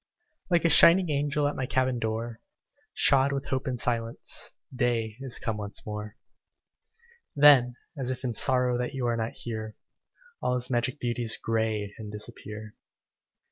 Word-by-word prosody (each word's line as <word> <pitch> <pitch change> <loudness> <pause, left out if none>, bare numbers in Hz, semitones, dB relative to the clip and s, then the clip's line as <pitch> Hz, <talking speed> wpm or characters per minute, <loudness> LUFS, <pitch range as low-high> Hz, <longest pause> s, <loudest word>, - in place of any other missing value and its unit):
Like 170 -2 +2
a - - +5
shining 170 +2 +7
angel 145 0 0
At 145 - -3
my 130 - -3
cabin 130 -1 0
door, 115 +1 -4 0.5
Shod 140 0 +4
with 140 0 -3
hope 135 +1 -2
and 125 -2 -2
silence, 115 -1 -1 0.3
Day 115 -3 0
is 130 -3 -1
come 110 -2 -3
once 105 -1 -4
more. 105 0 -6 1.2
Then, 140 -4 +6 0.2
as 130 -3 -4
if 130 0 -4
in 125 -2 -2
sorrow 125 0 +2
That 125 +3 -3
you 130 -2 -2
are 120 -1 +1
not 115 0 -3
here, 110 -2 -6 0.7
All 125 - 0
his 125 +1 -3
magic 125 +3 0
beauties 120 -2 -1
Gray 110 -2 -2
and 105 -2 -7
disappear. 105 0 -7
120 Hz, 155 wpm, -27 LUFS, 110-135 Hz, 1.2 s, shining